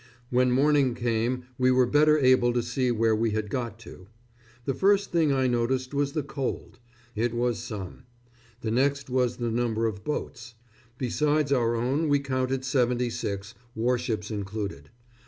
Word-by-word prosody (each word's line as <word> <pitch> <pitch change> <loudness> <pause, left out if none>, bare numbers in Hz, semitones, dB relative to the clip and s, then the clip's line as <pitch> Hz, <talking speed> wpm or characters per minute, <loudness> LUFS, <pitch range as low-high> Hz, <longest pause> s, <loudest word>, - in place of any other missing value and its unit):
When 125 0 +3
morning 135 -1 +3
came 120 +1 -1 0.2
we 130 0 +4
were 130 0 +4
better 150 +4 +4
able 130 -3 +4
to 120 -1 0
see 125 +2 -1
where 115 -1 +2
we 115 +1 +1
had 105 -1 -2
got 120 -4 -3
to. 95 -4 -12 0.6
The 135 - 0
first 200 +3 +2
thing 165 -4 +3
I 135 -1 +2
noticed 125 +2 0
was 140 0 0
the 155 -3 -1
cold. 135 -3 -5 0.4
It 115 +2 -1
was 120 -1 0
"some." 105 -6 -7 0.6
The 110 - -2
next 140 +2 0
was 125 -1 +1
the 120 -2 -2
number 115 -1 0
of 105 -3 -3
boats. 120 -5 -5 0.4
Besides 145 +3 0
our 120 -3 +2
own 135 +7 0
we 145 - +4
counted 130 -1 -2
seventy 125 -2 +1
six, 100 -2 -4 0.2
warships 115 -2 -1
included. 100 -7 -5
125 Hz, 160 wpm, -27 LUFS, 115-135 Hz, 0.6 s, we